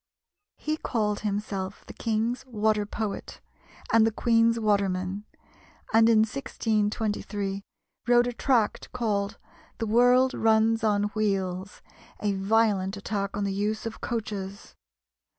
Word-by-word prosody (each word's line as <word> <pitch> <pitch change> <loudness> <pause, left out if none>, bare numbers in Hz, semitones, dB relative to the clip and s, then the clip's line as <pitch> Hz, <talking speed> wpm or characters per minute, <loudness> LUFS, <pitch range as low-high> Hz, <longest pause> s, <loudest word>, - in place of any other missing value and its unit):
He 310 0 -2
called 210 -7 -1
himself 200 -2 -3
"the - - -10
King's 230 +3 -1
Water 215 -3 +1
Poet" 215 -1 -5 0.5
and 225 -1 +6
"the 225 - +3
Queen's 230 +1 +3
Waterman;" 200 -2 0 0.7
and 225 +1 +6
in 225 - +5
1623 210 -4 -1 0.5
wrote 240 0 +5
a 245 - -2
tract 235 -3 +1
called 210 -4 -1 0.4
"The 225 - -2
World 245 +4 +4
runs 225 0 +3
on 205 -2 +2
Wheels" 195 -3 -2 0.4
a 205 -1 0
violent 200 -1 +1
attack 200 -1 -3
on 205 - -1
the 200 -1 -1
use 210 +3 -2
of 225 - -6
coaches. 205 -4 -5
215 Hz, 120 wpm, -27 LUFS, 200-225 Hz, 0.7 s, and